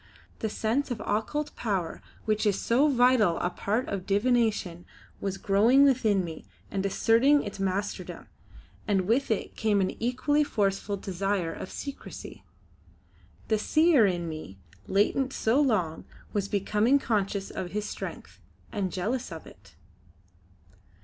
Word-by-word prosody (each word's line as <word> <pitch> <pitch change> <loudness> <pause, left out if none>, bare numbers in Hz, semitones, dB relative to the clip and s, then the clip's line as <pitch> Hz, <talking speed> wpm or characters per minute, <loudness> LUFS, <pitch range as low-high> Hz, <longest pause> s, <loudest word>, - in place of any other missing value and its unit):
The 220 - -1
sense 230 +7 -1
of 245 -3 -3
occult 225 +9 -2
power 195 -7 -2 0.2
which 215 0 +1
is 200 -2 +1
so 260 +6 +3
vital 245 - +4
a 175 - -1
part 215 +7 -1
of 190 -2 -4
divination 205 -5 +1 0.4
was 195 -1 -3
growing 220 +9 +4
within 225 -9 +3
me 160 -2 -8 0.3
and 195 -1 -1
asserting 230 +8 +3
its 200 -1 -7
masterdom, 195 +1 -3 0.6
and 200 -3 +2
with 230 +9 +1
it 220 - -2
came 210 -2 +1
an 190 -1 +1
equally 275 +5 +2
forceful 200 -6 -1
desire 195 -2 -2
of - - -7
secrecy. 280 -1 -8 1.0
The 220 -1 +1
Seer 310 -3 +4
in 175 -2 -2
me, 155 -12 -7 0.3
latent 235 +7 +1
so 235 +6 +2
long, 185 - 0 0.3
was 200 -2 0
becoming 210 +6 +2
conscious 200 -6 -1
of 180 - -4
his 210 +3 -3
strength, - - -7 0.3
and 195 -4 -2
jealous 230 +9 -2
of 165 -1 -8
it. - - -17
210 Hz, 135 wpm, -28 LUFS, 195-245 Hz, 1.0 s, vital